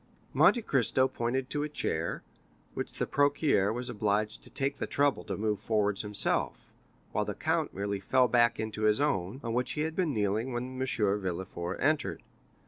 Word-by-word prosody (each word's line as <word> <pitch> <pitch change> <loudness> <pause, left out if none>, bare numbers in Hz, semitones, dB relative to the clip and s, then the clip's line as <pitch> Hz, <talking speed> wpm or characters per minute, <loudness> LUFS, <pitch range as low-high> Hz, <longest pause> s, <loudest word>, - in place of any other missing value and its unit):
Monte 235 - +5
Cristo 130 - +2
pointed 125 +2 -2
to 145 - -1
a 150 - -2
chair, 85 - -2 0.5
which - - -4
the - - -1
procureur 145 -8 +2
was 120 +2 -4
obliged 105 -2 -1
to - - -13
take 140 0 -2
the - - -3
trouble 140 -1 +2
to - - -5
move 105 -1 0
forwards 105 -3 0
himself, 105 -1 -1 0.5
while - - +1
the - - -4
count - - 0
merely 100 +1 -2
fell 125 +6 +3
back 120 -1 +3
into 110 0 -2
his 105 +2 +3
own, 105 -6 0
on 115 -1 -2
which 125 +1 0
he 150 - -2
had 160 +1 -2
been 180 -5 +1
kneeling 110 +2 0
when 130 +2 -4
M. 130 - 0
Villefort 95 -5 -1
entered. 155 +3 0
115 Hz, 180 wpm, -30 LUFS, 105-135 Hz, 0.5 s, Monte